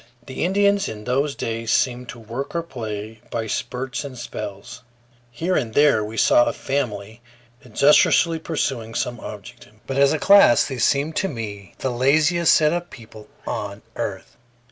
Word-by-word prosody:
The 130 Hz, -, -4 dB
Indians 200 Hz, +2 st, +2 dB
in 105 Hz, -1 st, -8 dB
those 140 Hz, +4 st, 0 dB
days 115 Hz, 0 st, -3 dB
seemed 125 Hz, -1 st, 0 dB
to 120 Hz, -, -8 dB
work 120 Hz, +8 st, -6 dB
or 170 Hz, -, 0 dB
play 110 Hz, -6 st, -7 dB
by 115 Hz, -1 st, -3 dB
spurts 130 Hz, +5 st, -4 dB
and 135 Hz, -3 st, -8 dB
spells. 100 Hz, -4 st, -7 dB, 0.5 s
Here 165 Hz, +10 st, -2 dB
and 115 Hz, -5 st, -2 dB
there 145 Hz, -7 st, +4 dB
we 110 Hz, +2 st, -7 dB
saw 120 Hz, -, +5 dB
a -, -, -1 dB
family 115 Hz, -5 st, -4 dB, 0.4 s
industriously 150 Hz, +6 st, +3 dB
pursuing 130 Hz, -8 st, -3 dB
some 120 Hz, -2 st, -2 dB
object; 105 Hz, -2 st, -10 dB, 0.2 s
but 135 Hz, -, -4 dB
as 140 Hz, 0 st, +5 dB
a 155 Hz, -, +1 dB
class 195 Hz, -, +6 dB
they 135 Hz, -3 st, -5 dB
seemed 140 Hz, +6 st, +1 dB
to 195 Hz, -, +1 dB
me 105 Hz, -, -7 dB
the 130 Hz, -, -2 dB
laziest 155 Hz, +7 st, +3 dB
set 155 Hz, 0 st, +3 dB
of 175 Hz, 0 st, -3 dB
people 110 Hz, -2 st, -13 dB, 0.2 s
on -, -, -5 dB
earth. -, -, -5 dB
130 Hz, 165 wpm, -22 LUFS, 115-150 Hz, 0.5 s, class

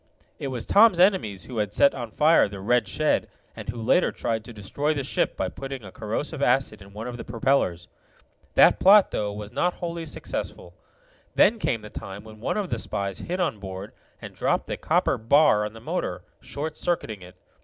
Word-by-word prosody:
It 140 Hz, -, -3 dB
was 125 Hz, -4 st, -3 dB
Tom's 205 Hz, -4 st, +5 dB
enemies 180 Hz, -, +2 dB
who 125 Hz, -4 st, -5 dB
had 105 Hz, -1 st, -1 dB
set 140 Hz, -, +5 dB
on 120 Hz, -3 st, -6 dB
fire 150 Hz, -1 st, +4 dB
the 100 Hz, -1 st, -8 dB
red 115 Hz, +2 st, +1 dB
shed, 155 Hz, +11 st, 0 dB, 0.3 s
and -, -, -8 dB
who 115 Hz, +1 st, -4 dB
later 110 Hz, -, +2 dB
tried 110 Hz, -1 st, -2 dB
to 120 Hz, -, -9 dB
destroy 140 Hz, +9 st, -2 dB
the 140 Hz, -, -2 dB
ship 130 Hz, -, -1 dB
by -, -, -1 dB
putting 135 Hz, -3 st, -7 dB
a 95 Hz, -, -10 dB
corrosive 125 Hz, -, -4 dB
acid 125 Hz, -5 st, +1 dB
in 100 Hz, +1 st, -14 dB
one 105 Hz, +3 st, -7 dB
of 120 Hz, -1 st, -6 dB
the -, -, -7 dB
propellers. 115 Hz, -7 st, 0 dB, 0.7 s
That -, -, +6 dB
plot, 200 Hz, +1 st, +7 dB
though, 105 Hz, -1 st, -2 dB
was 105 Hz, 0 st, -7 dB
not 180 Hz, 0 st, 0 dB
wholly 170 Hz, -2 st, -5 dB
successful. -, -, -5 dB, 0.6 s
Then 225 Hz, +1 st, +4 dB
came 115 Hz, -, -1 dB
the 105 Hz, -, -10 dB
time 100 Hz, +1 st, -8 dB
when 110 Hz, -1 st, -13 dB
one 120 Hz, -, -2 dB
of 200 Hz, -4 st, -3 dB
the 115 Hz, -, -1 dB
spies 100 Hz, -2 st, -4 dB
hid 180 Hz, +2 st, -4 dB
on 150 Hz, -, -1 dB
board, 95 Hz, 0 st, -7 dB, 0.3 s
and -, -, -9 dB
dropped -, -, 0 dB
the -, -, -4 dB
copper -, -, +1 dB
bar 115 Hz, -2 st, +4 dB
on 105 Hz, -, -12 dB
the 115 Hz, -, -11 dB
motor, -, -, -3 dB, 0.2 s
short 155 Hz, +2 st, -6 dB
circuiting 115 Hz, -, -2 dB
it. 90 Hz, +1 st, -13 dB
115 Hz, 205 wpm, -25 LUFS, 105-150 Hz, 0.7 s, plot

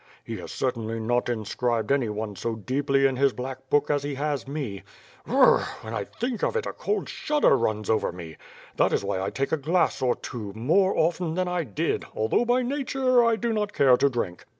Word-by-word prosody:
He -, -, -6 dB
has -, -, -8 dB
cer 130 Hz, -, 0 dB
tainly 115 Hz, -1 st, -5 dB
not 120 Hz, +2 st, 0 dB
inscribed 115 Hz, +1 st, -1 dB
anyone 110 Hz, -6 st, -1 dB
so 115 Hz, +4 st, -3 dB
deeply 135 Hz, +4 st, +1 dB
in 135 Hz, -1 st, +2 dB
his 135 Hz, -1 st, +3 dB
black 130 Hz, +1 st, -7 dB
book 145 Hz, +1 st, +2 dB
as 145 Hz, -1 st, +1 dB
he 145 Hz, 0 st, -4 dB
has 145 Hz, -1 st, -2 dB
me. 135 Hz, -9 st, -4 dB, 0.5 s
B -, -, -7 dB
r -, -, +1 dB
r -, -, +6 dB
r... -, -, -4 dB
When 110 Hz, -, -7 dB
I 105 Hz, -3 st, -2 dB
thing 240 Hz, -2 st, -4 dB
of -, -, 0 dB
it, 465 Hz, -, 0 dB
a -, -, -4 dB
cold 420 Hz, -, -2 dB
shudder 295 Hz, -, +2 dB
runs 110 Hz, -4 st, -1 dB
over 110 Hz, -1 st, +1 dB
me. 85 Hz, -3 st, -9 dB, 0.4 s
That -, -, +3 dB
is -, -, +1 dB
why 95 Hz, -, -1 dB
I 95 Hz, -, -1 dB
take 135 Hz, +6 st, -2 dB
a 160 Hz, -, +2 dB
glass 165 Hz, +5 st, +1 dB
or 125 Hz, -2 st, +2 dB
two, 105 Hz, -5 st, -7 dB
more 170 Hz, -, +2 dB
cften 165 Hz, 0 st, 0 dB
than 185 Hz, 0 st, 0 dB
I 180 Hz, -2 st, -1 dB
did, 100 Hz, -7 st, -1 dB
although, 110 Hz, -, +1 dB
by 245 Hz, +1 st, +2 dB
nature, 260 Hz, -2 st, +2 dB
I 230 Hz, -1 st, +3 dB
do 230 Hz, +1 st, -1 dB
not 210 Hz, -1 st, -1 dB
care 130 Hz, -3 st, +5 dB
to 140 Hz, +3 st, +3 dB
drink." 105 Hz, -9 st, -4 dB
135 Hz, 225 wpm, -26 LUFS, 110-180 Hz, 0.5 s, r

